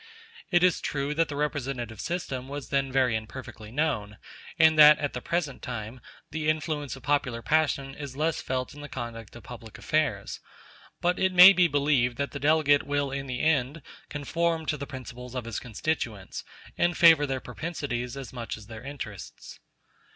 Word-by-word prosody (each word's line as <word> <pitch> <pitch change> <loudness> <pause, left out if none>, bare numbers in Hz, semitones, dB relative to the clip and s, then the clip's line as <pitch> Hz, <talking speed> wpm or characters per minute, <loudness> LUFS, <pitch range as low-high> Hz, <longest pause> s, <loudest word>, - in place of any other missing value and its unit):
It 175 -2 +3
is 180 -1 +3
true 140 0 -2
that 165 +2 +1
the 145 - -4
representative 135 -6 -3
system 135 -7 -4
was 140 0 -6
then 135 -1 0
very 130 -3 +2
imperfectly 110 0 -7
known, 120 -7 -1 0.4
and 160 -1 +6
that, 150 0 +10
at 145 - -3
the 125 - -4
present 170 -4 -2
time, 120 0 -6 0.3
the 155 0 -1
influence 155 -3 -2
of 135 - -13
popular 130 -5 0
passion 150 -3 +1
is 140 -2 -8
less 160 +2 0
felt 130 -1 -3
in 145 - -11
the 145 - -8
conduct 115 -2 -7
of 120 - -11
public 115 -2 -10
affairs; 155 -1 -1 0.6
but 175 +1 +1
it 190 0 +2
may 180 +2 +10
be 180 -1 +4
believed 140 -5 +1
that 140 0 -2
the 140 - -5
delegate 145 -1 +4
will 145 -1 -1
in 135 0 -4
the 125 -1 -3
end 145 -1 +1 0.3
conform 165 +2 -1
to 150 - 0
the 140 -1 -6
principles 125 -2 -9
of 125 -2 -3
his 115 -3 -4
constituents, 115 -4 -4 0.4
and 175 -1 +2
favor 160 -4 +7
their 135 -1 -2
propensities 125 -3 -4
as 135 -2 -8
much 120 -2 -5
as 105 - -12
their 110 0 -9
interests. 125 -8 -8
140 Hz, 180 wpm, -27 LUFS, 125-155 Hz, 0.6 s, that